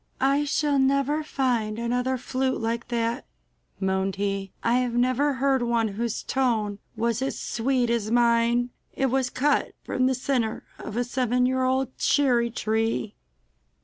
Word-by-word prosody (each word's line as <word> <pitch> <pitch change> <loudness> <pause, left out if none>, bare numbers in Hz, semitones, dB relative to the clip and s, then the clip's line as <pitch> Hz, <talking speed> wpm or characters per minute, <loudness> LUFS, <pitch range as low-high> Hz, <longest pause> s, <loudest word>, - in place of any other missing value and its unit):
'I 275 +2 +2
shall 290 -1 +1
never 275 +3 +2
find 240 -7 -1
another 250 +2 0
flute 260 +1 -1
like 230 +1 -2
that, 235 +1 -2 0.5
moaned 190 0 0
he. 195 -1 -2
'I 230 - +2
have 250 -2 -1
never 255 +4 +2
heard 265 0 +1
one 235 -2 +1
whose 230 +3 -3
tone 220 -6 0 0.2
was 230 +1 0
as 270 - -2
sweet 245 0 0
as 225 -3 0
mine! 235 +1 +3 0.2
It 270 -2 +1
was 260 -1 +1
cut 285 +3 +1
from 255 0 +1
the 260 - +1
centre 250 -4 -1 0.2
of 215 +1 -6
a 245 - +2
seven 250 0 +1
year 260 +1 +1
old 260 0 0
cherry 245 -5 +3
tree! 220 -1 -1
245 Hz, 150 wpm, -25 LUFS, 230-265 Hz, 0.5 s, mine